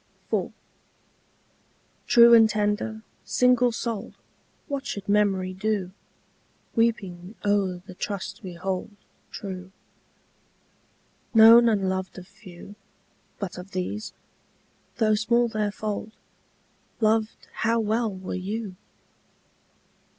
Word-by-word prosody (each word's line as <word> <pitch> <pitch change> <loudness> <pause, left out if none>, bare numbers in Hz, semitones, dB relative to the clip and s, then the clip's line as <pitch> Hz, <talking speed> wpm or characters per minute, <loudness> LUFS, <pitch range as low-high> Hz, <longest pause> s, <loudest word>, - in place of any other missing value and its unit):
IV. - - 0 1.6
True 235 0 +7
and 225 -1 +7
tender, 215 +1 -1 0.2
single 250 -1 +3
souled, 230 -2 -4 0.5
What 280 -3 -4
should 205 -8 -5
memory 195 -3 +1
do 195 -1 -2 0.8
Weeping 200 -4 -1
o'er 195 -3 0
the 185 - -10
trust 200 +1 -5
we 185 -4 -7
hold 185 +1 -3 0.4
True? 185 -2 -7 1.6
Known 230 +1 +9
and 200 -3 +1
loved 190 0 -3
of 180 -1 -10
few, 195 -2 -13 0.6
But 185 -3 -5
of 190 +2 -11
these, 185 +4 -4 0.8
though 220 -2 +2
small 235 +3 +2
their 215 -2 -1
fold, 215 +1 -5 0.9
Loved 220 0 0
how 230 +1 +1
well 220 +1 0
were 190 -1 -7
you! 200 +1 -4
210 Hz, 100 wpm, -25 LUFS, 190-225 Hz, 1.6 s, Known